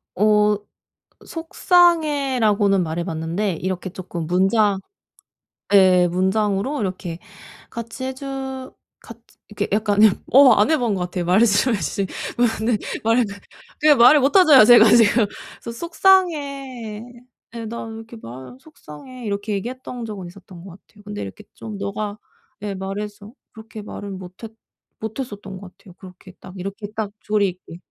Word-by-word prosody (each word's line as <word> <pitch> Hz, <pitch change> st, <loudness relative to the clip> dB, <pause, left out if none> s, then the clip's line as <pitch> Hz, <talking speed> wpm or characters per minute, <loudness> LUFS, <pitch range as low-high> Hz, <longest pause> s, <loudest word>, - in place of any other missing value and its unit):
어 210 Hz, +1 st, +3 dB, 0.7 s
"속상해."라고는 285 Hz, -, +2 dB
말해봤는데 170 Hz, +3 st, -3 dB
이렇게 185 Hz, 0 st, -3 dB
조금 175 Hz, -3 st, -6 dB
문장 195 Hz, +3 st, +2 dB, 0.9 s
예. 185 Hz, -2 st, +6 dB
문장으로 200 Hz, -, 0 dB
이렇게 180 Hz, -3 st, -4 dB, 0.5 s
같이 235 Hz, +2 st, -7 dB
해주 265 Hz, 0 st, -6 dB, 0.3 s
같 230 Hz, -, -13 dB, 0.3 s
이렇게 205 Hz, 0 st, -3 dB
약간 210 Hz, -1 st, 0 dB, 0.3 s
어 265 Hz, -2 st, +8 dB
안 210 Hz, +7 st, +3 dB
해본 245 Hz, -9 st, +1 dB
것 185 Hz, -, -4 dB
같아요. 180 Hz, 0 st, -3 dB
말씀해주신 200 Hz, +1 st, +2 dB
것이 230 Hz, +3 st, -2 dB
어 -, -, -1 dB
네. 230 Hz, -2 st, +2 dB, 0.3 s
말하는 230 Hz, +2 st, +3 dB
건. 200 Hz, -1 st, -9 dB, 0.4 s
그게 305 Hz, 0 st, +6 dB
말을 250 Hz, +5 st, +7 dB
못하잖아요. 285 Hz, -, +7 dB
제가 235 Hz, -1 st, +8 dB
지금. 230 Hz, -1 st, +5 dB, 0.4 s
"소 235 Hz, -, -6 dB
속상해." 280 Hz, -, 0 dB, 0.5 s
예. 230 Hz, -1 st, -5 dB
"나 230 Hz, +2 st, -6 dB
왜 225 Hz, 0 st, -8 dB
이렇게 225 Hz, +1 st, -11 dB
말 130 Hz, -, -10 dB
속상해." 255 Hz, -, -12 dB
이렇게 205 Hz, +1 st, -3 dB
얘기했던 245 Hz, +3 st, -5 dB
적은 200 Hz, -5 st, -7 dB
있었던 180 Hz, -1 st, -14 dB
것 195 Hz, -, -11 dB
같아요. 205 Hz, +3 st, -19 dB
근데 205 Hz, 0 st, -7 dB
이렇게 95 Hz, -, -8 dB
좀 215 Hz, -2 st, -8 dB
네가 205 Hz, +1 st, -4 dB, 0.5 s
예. 205 Hz, -1 st, -3 dB
말해서 205 Hz, +2 st, -6 dB, 0.2 s
그렇게 220 Hz, -1 st, -10 dB
말을 205 Hz, -1 st, -8 dB
못했 190 Hz, +4 st, -9 dB, 0.5 s
못했었던 210 Hz, -4 st, -6 dB
것 195 Hz, -2 st, -12 dB
같아요. 185 Hz, -5 st, -17 dB
그렇게 185 Hz, 0 st, -14 dB
딱 180 Hz, -, -12 dB
이렇게 200 Hz, +3 st, -6 dB
딱 215 Hz, -2 st, -3 dB
조리있게. 195 Hz, -5 st, -2 dB
210 Hz, 300 characters per minute, -21 LUFS, 190-245 Hz, 0.9 s, 어